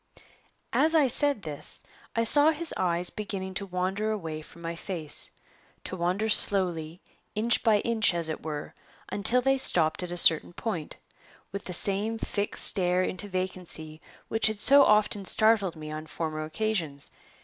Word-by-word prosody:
As 320 +1 +2
I 305 -3 +4
said 275 -3 +1
this 150 -3 -1 0.3
I 230 - +1
saw 290 +6 +3
his 320 +1 -3
eyes 175 -1 -1
beginning 195 -3 -6
to 200 +2 -5
wander 190 +4 -3
away 165 -8 -5
from 170 +2 -16
my 165 0 -5
face 165 -4 -2 0.5
to - - -6
wander 185 +5 -2
slowly, 180 -6 +1 0.3
inch 230 +3 +1
by 215 -3 +2
inch, 230 -3 +1
as 170 -2 0
it 155 - -5
were, 150 -2 -7 0.4
until 230 +5 +2
they 270 +1 0
stopped 160 -10 +3
at 180 -1 -6
a 175 - -5
certain 165 0 +7
point, 170 -7 -6 0.6
with 200 0 -7
the 180 - -7
same 205 +5 +4
fixed 205 -2 -1
stare 180 -1 +2
into 185 +2 -5
vacancy 180 -4 -3 0.3
which 225 -1 0
had 215 -1 -3
so 280 +5 +6
often 210 -1 +2
startled 215 -2 +2
me 155 -1 -9
on 155 +1 -8
former 155 -1 -5
occasions. 160 -5 -3
190 Hz, 160 wpm, -26 LUFS, 165-220 Hz, 0.6 s, certain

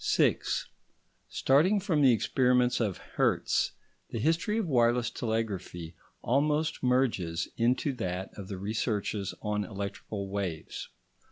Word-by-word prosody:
§ - - -11
6 - - +2 0.6
Starting 165 +10 +3
from 180 -6 +1
the 135 -3 +7
experiments 125 +1 +3
of 105 -6 0
Hertz, - - 0 0.4
the - - -4
history 165 - +1
of 225 - 0
wireless 120 -3 +3
telegraphy 100 -7 -3 0.3
almost 150 +5 +1
merges 115 -10 +1
into 125 +4 +1
that 95 -6 -3
of 100 -2 -8
the 95 - -5
researches 105 0 -2
on 105 -1 0
electrical 100 0 -5
waves. 95 -5 -4
115 Hz, 120 wpm, -29 LUFS, 100-135 Hz, 0.6 s, the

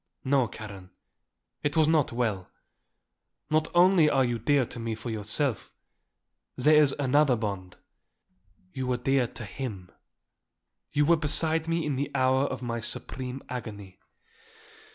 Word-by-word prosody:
No, 130 -2 +2
Karen, 100 -3 -10 0.7
it 145 +2 -1
was 155 -1 +5
not 155 -3 +2
well. 110 -6 -2 1.0
Not 155 0 +2
only 175 -3 +6
are 135 -2 +3
you 120 -1 -2
dear 140 +3 +2
to 120 - -8
me 115 -1 -3
for 115 +2 -6
yourself; 110 +3 -2 0.8
there 150 +4 +5
is 140 -2 +3
another 145 -1 +3
bond. 100 -5 -5 1.0
You 130 -1 -3
were 125 -1 0
dear 130 0 +1
to 115 0 -8
him. 100 -5 -7 1.0
You 145 0 +2
were 170 +2 +4
beside 160 +1 +2
me 165 0 0
in 145 -3 -1
the 140 - -2
hour 130 +1 +3
of 135 - -4
my 115 -1 -3
supreme 125 +3 -6
agony. 105 -6 -8
130 Hz, 140 wpm, -27 LUFS, 110-145 Hz, 1.0 s, only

